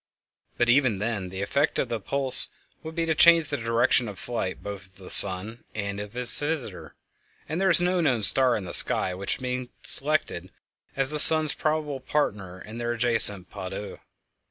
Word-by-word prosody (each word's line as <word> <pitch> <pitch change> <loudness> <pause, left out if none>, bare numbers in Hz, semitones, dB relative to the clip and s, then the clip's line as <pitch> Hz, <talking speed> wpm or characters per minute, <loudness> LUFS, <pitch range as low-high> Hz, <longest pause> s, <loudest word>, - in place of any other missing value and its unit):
But 120 - 0
even 120 -4 +1
then 105 -3 -5
the 95 +2 -6
effect 140 +9 -2
of 130 - -3
the 115 - -3
appulse 135 +5 -1 0.3
would 160 0 -10
be 165 -1 -2
to 160 - -1
change 165 -1 +4
the - - -3
direction 115 +1 0
of 100 -2 -10
flight, 115 -5 -6
both 100 -1 -9
of 95 - -33
the 95 -1 -13
sun 100 +5 +2
and 100 -1 -5
of 105 +3 -10
its 125 -1 +4
visitor, 145 - -6 0.5
and 160 +5 -5
there 195 - +1
is 170 -1 +2
no 180 0 -1
known 130 -9 -1
star 130 +3 +4
in 105 - -5
the 90 - -9
sky 90 - +3
which 95 +2 -4
can - - -18 0.2
be - - -27
selected 140 - 0 0.4
as 135 +1 0
the 150 - +2
sun's 155 -1 +9
probable 155 -3 -4
partner 105 -10 -4
in 110 +4 -11
their 120 0 -3
ancient 110 -5 +1
_pas 95 -2 -8
deux. 100 +2 -9
120 Hz, 195 wpm, -24 LUFS, 100-145 Hz, 0.5 s, sun's